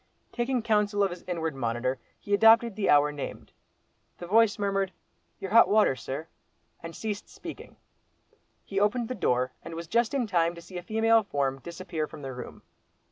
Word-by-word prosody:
Taking 245 0 -1
counsel 210 -2 +2
of 195 - +1
his 175 0 -8
inward 165 -3 -2
monitor, 125 0 -2 0.2
he 205 - -4
adopted 225 +1 +6
the 205 -1 -1
hour 145 0 +5
named. 145 -1 -7 0.6
The 175 - -7
voice 220 +3 +4
murmured, 195 -2 -1 0.5
"Your 190 - -6
hot 230 +2 +7
water, 210 -10 +4
sir," 140 +5 -6 0.5
and 165 0 -8
ceased 210 -2 -5
speaking. - - -10 0.9
He 195 - -2
opened 220 +3 +1
the - - -1
door, 125 - 0
and 165 - -8
was 170 +1 -5
just 235 - +1
in 260 -3 +1
time 170 -4 +1
to 170 - -10
see 180 +1 -8
a - - -8
female 225 +4 +3
form 140 -8 -2
disappear 170 +1 -5
from 150 - -11
the 135 -1 -5
room. 125 -1 -9
185 Hz, 180 wpm, -28 LUFS, 155-220 Hz, 0.9 s, hot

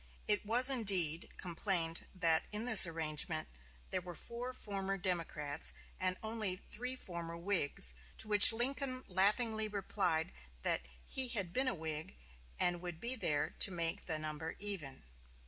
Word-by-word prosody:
It 210 -1 +1
was, 240 +4 +5
indeed, 190 - 0
complained 170 -2 -2
that 165 -3 +1
in 215 +2 0
this 220 -7 +13
arrangement 155 -1 -2 0.4
there 185 - -3
were 175 -1 -11
four 240 +8 -7
former 195 -5 -5
Democrats, 165 -5 -3 0.3
and 185 0 0
only 220 -4 -3
three 250 +7 -8
former 170 -7 -9
Whigs; 170 - -1 0.2
to - - -3
which 210 0 +9
Lincoln 255 +2 -1
laughingly 215 +4 0
replied 195 -5 -3 0.3
that - - -1 0.2
he 265 -1 -1
had 200 -8 -3
been 260 +1 +1
a 255 - +1
Whig, 155 - -3 0.4
and 175 -1 -1
would 175 -2 -8
be 240 +7 +3
there 150 - -1
to - - +6
make 170 -2 -2
the 160 -3 -3
number 155 +1 -7
even. 175 - -7
185 Hz, 145 wpm, -33 LUFS, 165-220 Hz, 0.4 s, this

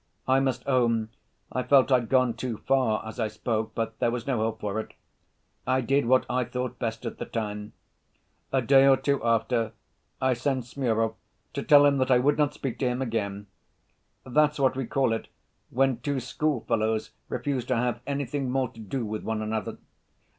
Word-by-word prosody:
I 130 +1 +4
must 135 -1 -1
own 115 -4 +2 0.4
I 130 - -1
felt 135 +1 +4
I'd 125 -3 +3
gone 130 -2 +3
too 120 -1 -4
far 130 -5 +1
as 110 - -8
I 110 - +1
spoke, 110 +1 -3
but 115 -1 -3
there - - +2
was 120 0 -3
no 130 -5 0
help 110 0 -1
for 105 +1 -2
it. 110 - -7 0.7
I 130 0 +2
did 135 0 +1
what 130 +1 +4
I 125 0 0
thought 125 +1 -4
best 115 0 -3
at 115 - -5
the - - -3
time. 105 -2 -4 0.8
A 130 -2 +1
day 135 +2 +6
or 135 -1 +6
two 140 0 0
after, 115 0 +1 0.5
I 130 -1 +2
sent 130 0 -1
Smurov 115 -3 0 0.4
to - - -2
tell 145 -1 +7
him 140 -1 +3
that 130 0 +1
I 125 - +6
would 145 +5 +2
not 145 -1 +2
speak 130 -4 -4
to 130 - +1
him 125 0 -1
again. 105 -5 -2 0.8
That's 150 +3 +2
what 130 -1 +3
we 130 -2 -3
call 130 -2 +1
it 115 - -4 0.4
when 130 -1 +1
two 140 +1 -1
schoolfellows 115 -5 -1 0.2
refuse 140 -4 -2
to 130 - 0
have 120 0 -1
anything 140 -1 -2
more 130 -1 0
to 115 - -16
do 115 +3 -3
with 105 0 -4
one 110 -1 -2
another. 110 -1 -3
125 Hz, 190 wpm, -27 LUFS, 115-135 Hz, 0.8 s, tell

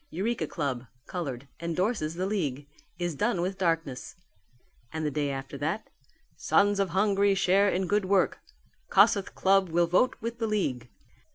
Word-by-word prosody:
Eureka 215 +8 -2
Club 135 -6 -3 0.2
(Coloured) 140 -7 -5
endorses 170 0 -1
the 185 +2 -2
League; 150 -9 -2 0.3
Is 175 -1 -2
done 205 +4 0
with 185 +2 -2
Darkness"; 165 -7 -1 0.8
and 160 -1 -3
the 150 - 0
day 145 0 -1
after 135 0 -5
that, 160 +10 -3 0.4
"Sons 205 0 +2
of 195 -2 +1
Hungary 200 +2 +2
Share 195 +1 +3
in 185 +1 0
Good 205 +2 +1
Work: 190 0 +2 0.5
Kossuth 200 -2 +4
Club 195 -1 +3
will 170 +1 +3
vote 180 +9 +2
with 230 +1 -5
the 225 - 0
League." 130 - -1
180 Hz, 155 wpm, -28 LUFS, 155-200 Hz, 0.8 s, Kossuth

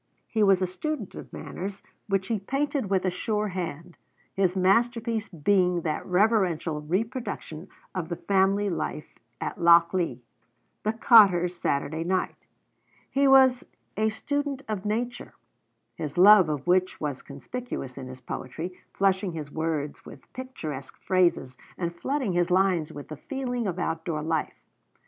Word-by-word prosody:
He 220 - -1
was 195 -2 +4
a - - +3
student 225 - -4
of - - -10
manners, 195 +2 -6 0.2
which 195 -2 0
he 225 -3 0
painted 275 +2 -1
with 190 -1 +1
a 185 - +2
sure 210 +3 -1
hand, 175 -2 -5 0.4
his 190 -1 +1
masterpiece 225 +3 +1
being 180 +1 +2
that 155 -2 -2
reverential 180 -6 +2
reproduction 185 - -3 0.3
of 180 -3 -4
the 170 - -2
family 195 +2 +2
life 165 -4 -4 0.3
at - - -4
Lochlea, 170 -4 +4 0.6
'The 215 - 0
Cotter's 195 -7 +6
Saturday 160 0 -1
Night.' 185 +2 -2 0.6
He 275 0 +3
was 265 -2 +6 0.3
a 220 +1 +2
student 285 +4 -3
of 210 -2 -4
nature, 235 +4 -3 0.6
his 155 -2 -6
love 190 -2 +8
of 145 -3 -3
which 185 +1 +2
was 145 -4 -3
conspicuous 140 - -6
in 130 -2 -7
his 130 0 -10
poetry, 160 +8 -6 0.2
flushing 190 -1 +1
his 150 -3 -6
words 155 -2 -3
with 135 - -14
picturesque 155 - -7
phrases 175 -9 +1 0.2
and 170 -1 -3
flooding 260 +1 -1
his 175 0 +1
lines 180 -4 +2
with 145 - -9
the 155 - -7
feeling 245 - -3
of 180 -2 -3
outdoor 165 -2 -2
life. 160 0 -2
185 Hz, 145 wpm, -27 LUFS, 165-215 Hz, 0.6 s, love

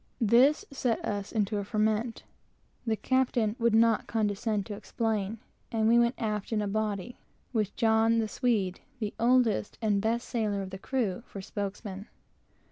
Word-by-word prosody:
This 250 - +4
set 250 -4 0
us 205 -1 -3
into 210 -1 0
a - - -2
ferment. 220 +2 0 0.6
The 220 - +2
captain 245 -3 +1
would 230 -1 +3
not 225 -1 +4
condescend 210 -1 0
to 215 - -6
explain, 215 0 -2 0.3
and 220 -1 +1
we 235 +1 +6
went 235 +1 +3
aft 210 -2 -2
in 220 - +1
a 205 - -1
body, 215 +2 -2 0.3
with 215 -4 +1
a 225 0 +4
Swede, 210 -5 0 0.2
the 215 -4 -3
oldest 240 -3 +2
and 210 -3 +1
best 230 +3 0
sailor 210 -4 -1
of 190 - -8
the 190 - -7
crew, 235 -5 -1
for 200 - -8
spokesman. 200 +1 -5
220 Hz, 155 wpm, -29 LUFS, 205-235 Hz, 0.6 s, we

